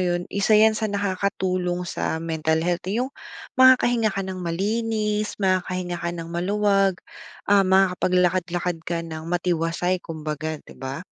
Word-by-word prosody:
yun, 175 Hz, -1 st, 0 dB
isa 200 Hz, +2 st, +3 dB
'yan 220 Hz, +1 st, +6 dB
sa 220 Hz, 0 st, -2 dB
nakakatulong 185 Hz, -3 st, -1 dB
sa 165 Hz, -, -2 dB
mental 160 Hz, 0 st, 0 dB
health, 175 Hz, 0 st, -1 dB
eh, 220 Hz, +5 st, 0 dB
yung 270 Hz, -, -8 dB, 0.5 s
makakahinga 245 Hz, -3 st, +5 dB
ka 195 Hz, -, -1 dB
ng 190 Hz, -1 st, -5 dB
malinis, 210 Hz, +4 st, -1 dB
makakahinga 185 Hz, -2 st, -1 dB
ka 170 Hz, -, -2 dB
ng 165 Hz, -1 st, -6 dB
maluwag. 195 Hz, +1 st, +2 dB, 0.5 s
Ah, 200 Hz, -1 st, +4 dB
makakapaglakad-lakad 180 Hz, -2 st, +1 dB
ka 170 Hz, -1 st, -2 dB
ng 160 Hz, -1 st, -7 dB
matiwasay 175 Hz, +1 st, 0 dB
kumbaga, 155 Hz, -1 st, -4 dB
di -, -, -13 dB
ba? 135 Hz, +4 st, -5 dB
180 Hz, 140 wpm, -23 LUFS, 170-200 Hz, 0.5 s, yan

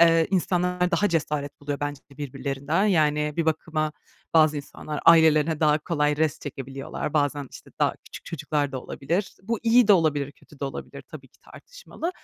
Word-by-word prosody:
eee, 165 Hz, -1 st, +6 dB
insanlar 180 Hz, -1 st, +1 dB
daha 205 Hz, +4 st, +2 dB
cesaret 150 Hz, -4 st, -2 dB
buluyor 145 Hz, 0 st, -4 dB
bence 145 Hz, -1 st, -3 dB
de 140 Hz, -, -17 dB
birbirlerinden. 140 Hz, +5 st, -2 dB
Yani, 150 Hz, -5 st, +2 dB
bir 165 Hz, -, +1 dB
bakıma, 155 Hz, -1 st, -1 dB, 0.4 s
bazı 155 Hz, -1 st, +5 dB
insanlar 145 Hz, +1 st, -6 dB
ailelerine 160 Hz, -1 st, +5 dB
daha 150 Hz, 0 st, +4 dB
kolay 150 Hz, -2 st, 0 dB
rest 155 Hz, 0 st, 0 dB
çekebiliyorlar. 135 Hz, +1 st, -5 dB
Bazen, 145 Hz, -2 st, 0 dB
işte, -, -, -13 dB
daha -, -, +2 dB
küçük -, -, -11 dB
çocuklar 150 Hz, -3 st, -2 dB
da 130 Hz, -, -3 dB
olabilir. 175 Hz, +8 st, -3 dB
Bu 225 Hz, +2 st, -2 dB
iyi 230 Hz, 0 st, +5 dB
de 205 Hz, -, +9 dB
olabilir, 145 Hz, -5 st, +2 dB
kötü 150 Hz, -, -20 dB
de -, -, -1 dB
olabilir 135 Hz, -, -7 dB
tabii -, -, -12 dB
ki -, -, -30 dB
tartışmalı 485 Hz, -8 st, -8 dB
155 Hz, 170 wpm, -25 LUFS, 145-170 Hz, 0.4 s, de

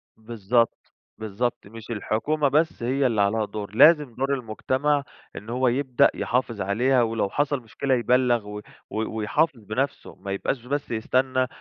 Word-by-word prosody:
بالضبط، 115 Hz, +1 st, -1 dB, 0.2 s
بالضبط، 110 Hz, +1 st, -3 dB
مش 115 Hz, +1 st, -12 dB
الحكومة 140 Hz, +8 st, 0 dB
بس 150 Hz, -1 st, +1 dB
هي 130 Hz, +3 st, +1 dB
اللي 110 Hz, -4 st, +1 dB
عليها 105 Hz, +2 st, +1 dB
دور، 105 Hz, -1 st, -7 dB
لازم 150 Hz, -2 st, +5 dB
دور 135 Hz, +2 st, 0 dB
المجتمع، 135 Hz, +4 st, -1 dB, 0.3 s
إن 105 Hz, -, -9 dB
هو 125 Hz, +2 st, +1 dB
يبدأ 130 Hz, 0 st, +3 dB
يحافظ 120 Hz, -4 st, -1 dB
عليها 120 Hz, +6 st, +2 dB
ولو 115 Hz, -3 st, -1 dB
حصل 145 Hz, +1 st, 0 dB
مشكلة 130 Hz, +4 st, -2 dB
يبلَّغ 120 Hz, -2 st, +2 dB
و 105 Hz, 0 st, -6 dB, 0.3 s
و 110 Hz, +1 st, -3 dB
ويحافظ 130 Hz, +5 st, 0 dB
بنفسه 130 Hz, +7 st, -3 dB
ما 100 Hz, -, -7 dB
يبقاش 120 Hz, +5 st, -3 dB
بس 145 Hz, +1 st, -3 dB
يستنى 130 Hz, +3 st, 0 dB
إن 130 Hz, -, +1 dB
120 Hz, 155 wpm, -24 LUFS, 110-135 Hz, 0.3 s, لازم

